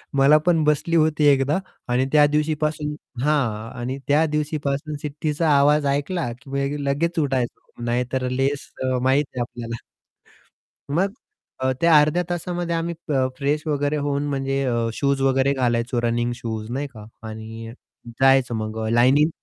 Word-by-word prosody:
मला 140 +3 +6
पण 165 -3 +3
बसली 150 +3 +1
होती 155 -1 +3
एकदा 140 +1 +4 0.3
आणि 125 +2 +2
त्या 150 -1 +6
दिवशीपासून 150 0 -1 0.3
हां. 120 -7 0
आणि 125 +3 -3
त्या 150 +3 +4
दिवशीपासून 150 -1 -2
शिट्टीचा 150 +2 -1
आवाज 145 +1 +4
ऐकला 145 0 -1
की 140 +1 -2
लगेच 165 +5 0
उठायचो 130 -4 -3
नाहीतर 125 +2 -1
लेस 135 +2 -1 0.2
अ, 130 0 +1
माहिती 130 0 +1
आहे - - +1
आपल्याला. 115 -1 -6 1.1
मग 190 +6 +1 0.5
अ, 130 0 +1
त्या 165 -2 +6
अर्ध्या 155 +4 +2
तासामध्ये 175 0 -2
आम्ही 165 +1 -2
प - - -3 0.3
फ्रेश 145 +2 0
वगैरे 145 0 0
होऊन 145 -1 -1
म्हणजे 135 0 -1
अ, 120 -2 0
शूज 140 0 0
वगैरे 135 +1 +3
घालायचो, 120 -1 0
रनिंग 120 0 0
शूज 110 -2 -5
नाही 140 +3 -2
का. 110 -6 -12 0.2
आणि 110 +1 -8 0.5
जायचं 135 -3 +4
मग 110 0 -4 0.2
लाइनिंग 135 +6 +5
140 Hz, 145 wpm, -23 LUFS, 125-150 Hz, 1.1 s, मला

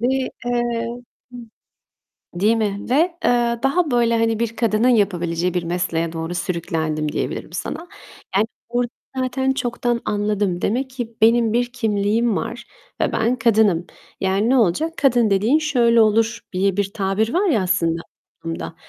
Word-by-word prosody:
Ve, 240 - +1 0.4
eee 240 -1 -1 1.5
değil 210 +6 +2
mi? 205 -2 -1
Ve - - +3 0.3
eee, 240 -1 +2
daha 300 +4 +1
böyle, 235 -2 +2
hani, 225 -1 +1
bir 230 -1 -2
kadının 225 +1 +2
yapabileceği 180 -6 +1
bir 180 - 0
mesleğe 170 -1 -1
doğru 165 +1 -4
sürüklendim 160 -4 -2
diyebilirim - - -4
sana. 345 - -5 0.5
Yani, 210 +2 +3 0.2
orada 240 0 -1 0.3
zaten 265 +1 0
çoktan 240 -2 -1
anladım. 205 -3 -1
Demek 260 +5 0
ki 240 -3 -6
benim 230 0 +4
bir 240 +1 0
kimliğim 220 -1 +1
var 235 -1 -4 0.4
ve - - +1
ben 230 +3 +1
kadınım. 220 -7 +3 0.3
Yani 195 +3 +1
ne 265 - +4
olacak? 235 - +1
"Kadın 240 -5 +3
dediğin 215 +9 +3
şöyle 240 -7 +3
olur." 225 +1 +2
diye 190 +1 +1
bir 200 -1 -1
tabir 210 +3 0
var 380 +2 +2
ya 225 - +2
aslında 170 -3 0 0.4
toplumda. 165 0 -5
225 Hz, 145 wpm, -21 LUFS, 190-240 Hz, 1.5 s, benim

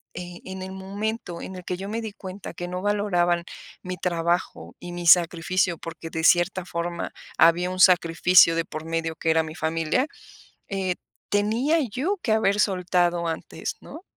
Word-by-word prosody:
eh, 175 0 -7
en 190 0 -6
el 190 - -7
momento 195 -1 -4
en 190 - -7
el 180 - -8
que 180 - -3
yo 195 +2 -6
me 225 +2 -3
di 220 -2 -5
cuenta 190 -1 -8
que 175 - -5
no 180 +1 -4
valoraban 180 -4 +1 0.4
mi 180 0 -5
trabajo 170 +1 -1
y 175 0 -8
mi 175 0 -5
sacrificio 175 +1 +4
porque, 165 0 -8
de 160 0 -4
cierta 175 +1 +3
forma, 170 0 -4 0.3
había 175 +2 +5
un 185 - -5
sacrificio 180 -1 +6
de 165 0 0
por 155 -1 -7
medio, 165 0 -2
que 160 - -2
era 160 0 +4
mi 155 - -7
familia, 165 - 0 0.6
eh, 190 -2 -1 0.3
tenía 230 +10 +2
yo 295 - -1
que 220 - +1
haber 210 -1 +2
soltado 175 -3 +1
antes, 165 - -5
¿no? 325 - -10
180 Hz, 175 wpm, -25 LUFS, 170-195 Hz, 0.6 s, sacrificio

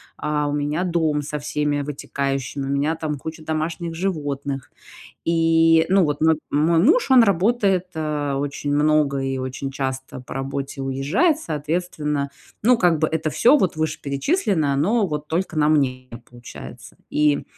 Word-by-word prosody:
а, 150 -1 -1
у 145 - -2
меня 150 +4 -1
дом 160 -4 +1
со 150 +1 -4
всеми 150 -1 -1
вытекающими, 140 -1 -3
у 135 - -4
меня 145 +4 0
там 155 -2 -3
куча 160 +3 -8
домашних 160 +2 -3
животных. 145 -7 -3 0.5
И, 165 0 +4
ну 195 0 +5
вот, 145 -2 0
нап 160 -1 +3
мой 160 +3 +3
муж, 320 - +4
он 255 -2 +8
работает, 200 -1 +2
э, 150 -2 -2
очень 145 +1 -2
много 150 -1 +2
и 135 0 -2
очень 130 +1 -4
часто 130 -1 -4
по 125 - -9
работе 135 +1 -4
уезжает. 145 - +1
Соответственно, 150 - -2 0.3
ну, 250 +2 +6
как 175 -6 +3
бы, 155 - +2
это 160 0 -2
всё, 250 - +5
вот, 185 - 0
вышеперечисленное, 155 - 0
оно, 200 +10 +2
вот, 150 -2 -4
только 170 0 -2
на 150 0 +3
мне 130 -4 +1 0.2
получается. 120 0 -11
И, 150 -1 +2
150 Hz, 155 wpm, -22 LUFS, 140-165 Hz, 0.5 s, он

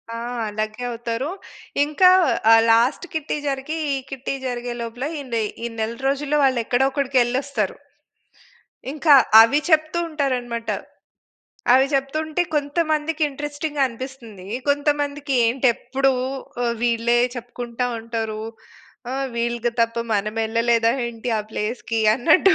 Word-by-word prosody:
ఆ! - - -4 0.3
అలాగే 215 +3 -4
అవుతారు. 235 +3 -3 0.6
ఇంకా 305 +5 +5 0.4
ఆహ్, 225 0 +8
లాస్ట్ 240 +9 +3
కిట్టీ 310 -1 -2
జరిగీ, 275 +3 -3 0.2
ఈ - - 0
కిట్టీ 270 0 -4
జరిగే 245 -1 -4
లోపల 235 +3 -5 0.2
ఇందె 235 -4 -2 0.2
ఈ - - 0
నెల 220 +1 -2
రోజుల్లో 285 +2 0
వాళ్ళు 260 -3 +3
ఎక్కడో 250 +3 +2
ఒకడికి 275 -1 -1
వెళ్ళొస్తారు. 270 - -1 1.2
ఇంకా 300 +1 +4 0.3
అవి 230 +6 +4
చెప్తూ 310 0 +3
ఉంటారు 285 -4 0
అన్నమాట. 235 -1 -6 1.1
అవి 265 +1 +5
చెప్తుంటే 310 +5 0
కొంతమందికి 310 +1 0
ఇంట్రెస్టింగ్‌గా 290 +1 -3
అనిపిస్తుంది. 235 -6 -9 0.2
కొంతమందికి 290 0 0
ఏంటి 255 +3 +1
ఎప్పుడు 270 +3 0 0.5
ఆహ్, 235 -1 0
వీళ్ళే 235 0 +2 0.2
చెప్పుకుంటా 240 0 -4
ఉంటారు. 225 -1 -4 0.7
ఆహ్, 270 +1 -1
వీళ్ళకి 235 0 -1
తప్ప 230 0 +1 0.2
మనం 210 +1 -1
వెళ్ళలేదా 230 +1 +2 0.2
ఏంటి 235 +1 -5
ఆ - - 0
ప్లేస్‌కి 225 +1 -2
అన్నట్టు 320 - +4
255 Hz, 120 wpm, -22 LUFS, 230-290 Hz, 1.2 s, ఆహ్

